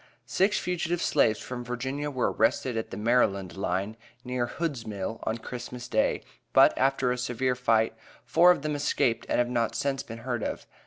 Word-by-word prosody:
Six 195 +3 +2
fugitive 175 -1 -1
slaves 110 -10 +3
from 125 -1 -6
Virginia 130 +4 -3
were 130 -3 0
arrested 125 -3 +1
at 110 - -3
the - - -7
Maryland 105 -5 +1
line, 95 +3 -2 0.3
near 125 -1 -1
Hood's 145 -4 -3
Mill, 105 +1 -4
on 110 - -1
Christmas 120 +1 -7
day, 110 -2 +1 0.3
but, - - +6
after 135 -1 +2
a 125 - -2
severe 125 +1 0
fight, 115 -3 +2 0.3
four 175 +2 +5
of 180 -5 +4
them 155 0 -1
escaped 120 -5 0
and - - +1
have 120 - +2
not 115 -2 0
since 140 -1 -1
been 115 - -8
heard 120 -3 -2
of. - - -4
125 Hz, 180 wpm, -28 LUFS, 115-135 Hz, 0.3 s, but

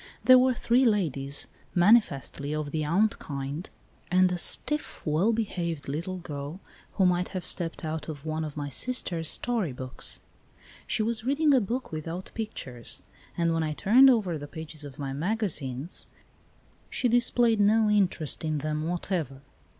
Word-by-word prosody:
There 255 0 +8
were 255 0 +3
three 240 +3 +2
ladies, 150 - +1 0.3
manifestly 175 - +3
of 150 -1 -3
the 155 0 -1
aunt 190 +8 +1
kind, 140 +3 -5 0.4
and 185 0 +4
a 180 - -1
stiff, 300 +10 +2
well 165 +8 +2
behaved 175 -9 -3
little 170 +7 -3
girl 150 0 -7 0.3
who 190 - +2
might 180 0 +2
have 180 - -5
stepped 165 -2 -1
out 160 +1 -4
of 145 -1 -7
one 155 0 -2
of 150 -1 -6
my 145 -1 -3
sister's 170 - -1
story 230 - 0
books. 130 0 -4 0.7
She 215 - 0
was 225 0 -2
reading 285 +4 +3
a 260 - +5
book 240 +6 -3
without 165 +4 -6
pictures, 130 - -6 0.3
and 170 -1 +2
when 165 - 0
I 155 -1 -1
turned 250 - +6
over 195 - +1
the 145 - -7
pages 160 -1 -7
of 140 -3 -10
my 135 -2 -4
magazines 160 - -2 0.8
she 250 - 0
displayed 240 -1 +4
no 215 +2 +4
interest 190 -8 +1
in 155 -1 -1
them 155 +2 -2
whatever. 165 -6 -3
170 Hz, 160 wpm, -27 LUFS, 150-220 Hz, 0.8 s, There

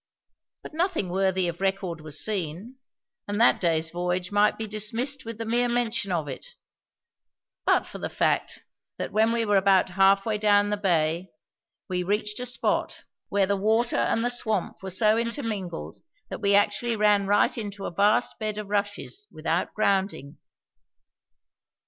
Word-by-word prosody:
But - - -10
nothing 330 - -1
worthy 190 0 +1
of 170 +1 -5
record 190 -4 -1
was 150 -1 -4
seen; 200 - -4 0.5
and 205 +1 -2
that 235 - +5
day's 165 -2 +1
voyage 180 +1 -2
might 205 +1 +3
be 220 - -3
dismissed 225 +6 -2
with 230 -1 -6
the 225 - -4
mere 240 +2 +1
mention 235 -3 0
of 165 -4 -1
it, - - -8 1.1
but - - +3
for - - -9
the - - -4
fact - - -1 0.3
that - - -4
when 220 +1 +3
we 230 -1 0
were 205 -1 +3
about 190 -1 +4
half 195 +1 +4
way 215 -2 -1
down 205 -1 +3
the - - +2
bay 175 -2 0 0.6
we 180 -1 -1
reached 210 +3 -1
a 250 - -3
spot 240 -1 -1 0.3
where 200 -1 +2
the 200 +1 0
water 220 +4 +1
and 230 - +1
the 245 - +1
swamp 220 -6 -2
were 190 - -6
so 215 +4 +3
intermingled 215 - -4 0.3
that - - -6
we 200 0 +3
actually 210 +3 +2
ran 205 -2 +3
right 205 +1 +3
into 205 -3 -5
a - - -4
vast 205 +6 +2
bed 215 -1 -3
of 210 -1 -6
rushes 205 - -3
without - - -2
grounding. 190 -8 0
205 Hz, 165 wpm, -26 LUFS, 190-225 Hz, 1.1 s, that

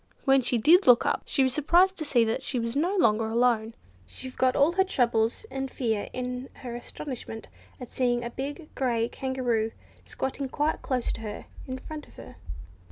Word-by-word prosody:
When 270 -1 +5
she 245 0 +1
did 335 - +5
look 245 -2 +7
up, - - +1
she 270 - +2
was 260 -1 +1
surprised 350 +6 +4
to 310 - -4
see 245 -5 +3
that 225 0 -1
she 260 - -3
was 230 +1 -2
no 345 +7 +1
longer 225 - +3
alone. 230 -1 +1 0.3
She 260 - -8
forgot 255 0 +1
all 285 +4 +4
her 380 +2 +3
trouble 235 -10 +2 0.2
and 270 0 -3
fear 225 -5 -2
in 250 +1 -4
her 240 -2 -5
astonishment 240 -2 -7 0.3
at 250 - -7
seeing 240 -1 0
a 235 - -4
big 290 +5 -6
grey 235 -3 0
Kangaroo 245 -4 -1 0.3
squatting 265 0 -4
quite 300 +4 0
close 255 -3 -1
to - - -7
her, 210 -2 -6 0.2
in 260 0 -4
front 300 +3 -8
of - - -19
her. - - -12
255 Hz, 190 wpm, -27 LUFS, 235-280 Hz, 0.3 s, look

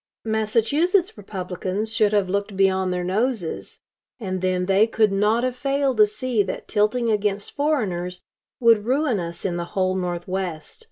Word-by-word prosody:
Massachusetts 230 - +1
Republicans 190 +1 -4
should 215 -2 +3
have 205 -3 +2
looked 200 +1 -2
beyond 190 -1 +2
their 180 0 -2
noses, 205 0 -2 0.4
and 185 -4 -3
then 185 -1 0
they 195 +3 +4
could 220 -2 +2
not 210 +4 +2
have 255 -1 -1
failed 275 -1 0
to 210 -1 +7
see 215 +2 -1
that 190 - -4
tilting 220 +3 +1
against 205 -1 -1
foreigners 190 - -1 0.4
would 230 -3 +4
ruin 260 -3 +1
us 170 +1 -6
in 175 -2 -1
the 170 - -3
whole 185 0 +2
Northwest. 180 -2 -4
205 Hz, 155 wpm, -23 LUFS, 185-230 Hz, 0.4 s, to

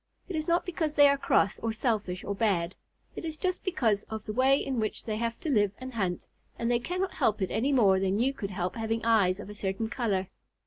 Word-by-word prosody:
It 375 - -4
is 310 0 -2
not 340 +1 +2
because 320 -4 -2
they 290 0 +8
are 280 - +4
cross, 205 -7 +2
or 225 - -1
selfish, 215 -5 -1
or 200 - -2
bad. 190 -5 0 0.4
It - - -6
is 320 -2 -4
just 365 +2 -2
because 230 - +1
of 220 0 -5
the 215 - -4
way 265 +3 +4
in 265 -4 -2
which 215 -1 -2
they 215 -2 -2
have 230 +1 -2
to 325 - -3
live 205 -5 +3
and 255 0 -8
hunt, 185 -6 -2 0.3
and 235 +1 0
they 240 - +3
cannot 365 +9 -2
help 215 0 +1
it 190 -3 -1
any 265 +6 +1
more 200 -8 +4
than 195 +1 +1
you 260 +5 +2
could 200 -7 -5
help 185 -2 -2
having 225 0 -2
eyes 200 -5 +3
of 205 - -7
a 210 - -8
certain 205 +2 -2
color. 200 -7 -1
225 Hz, 240 wpm, -29 LUFS, 200-270 Hz, 0.4 s, they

